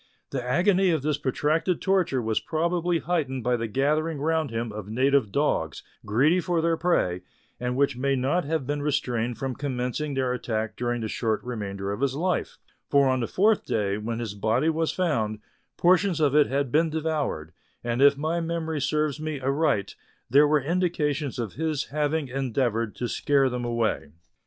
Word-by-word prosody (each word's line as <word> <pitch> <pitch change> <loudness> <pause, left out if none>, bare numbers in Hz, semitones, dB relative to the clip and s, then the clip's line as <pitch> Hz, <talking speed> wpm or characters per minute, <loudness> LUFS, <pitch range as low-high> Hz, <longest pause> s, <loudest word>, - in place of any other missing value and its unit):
The 130 -3 -2
agony 185 +8 +3
of 160 -5 +1
this 150 -1 0
protracted 155 +6 0
torture 175 -10 +1
was 110 -1 0
probably 170 +2 0
heightened 145 -6 -2
by 125 +1 +2
the 115 -1 -2
gathering 150 +7 0
round 160 0 0
him 115 0 -3
of 105 -1 -7
native 130 -1 +2
dogs, - - 0 0.2
greedy 140 +12 +3
for 175 -1 0
their 165 0 +2
prey, 90 - +1 0.4
and 125 +1 -2
which 140 -1 +2
may 135 +2 0
not 135 +8 +1
have 155 -1 -2
been 145 +2 -2
restrained 125 -5 -1
from 135 +1 -3
commencing 135 +2 -3
their 130 -2 0
attack 110 -3 -3
during 120 -1 -2
the 110 - -2
short 110 0 -1
remainder 100 -5 -4
of 105 - -4
his 135 -1 +1
life; 180 +5 -1 0.3
for 140 -1 +4
on 130 0 +1
the 115 - -1
fourth 215 +3 +2
day, 100 -1 -1
when 115 +2 -3
his 115 -4 -4
body 110 +9 +1
was 160 0 0
found, 115 -13 0 0.4
portions 180 0 +3
of 145 -3 +3
it 150 -1 +5
had 140 -1 -1
been 160 +3 +3
devoured, 155 - -2 0.3
And 120 +2 -1
if 140 0 +6
my 160 +4 -1
memory 160 -2 -2
serves 150 +1 0
me 155 -2 -3
aright 135 -6 0 0.4
there 145 +3 +6
were 150 0 +3
indications 150 -4 -1
of 115 -5 -3
his 155 -2 -2
having 150 0 0
endeavoured 120 -4 -1
to 120 - -3
scare 135 +2 +2
them 125 -1 -3
away. 115 -9 -1
140 Hz, 180 wpm, -26 LUFS, 120-160 Hz, 0.4 s, if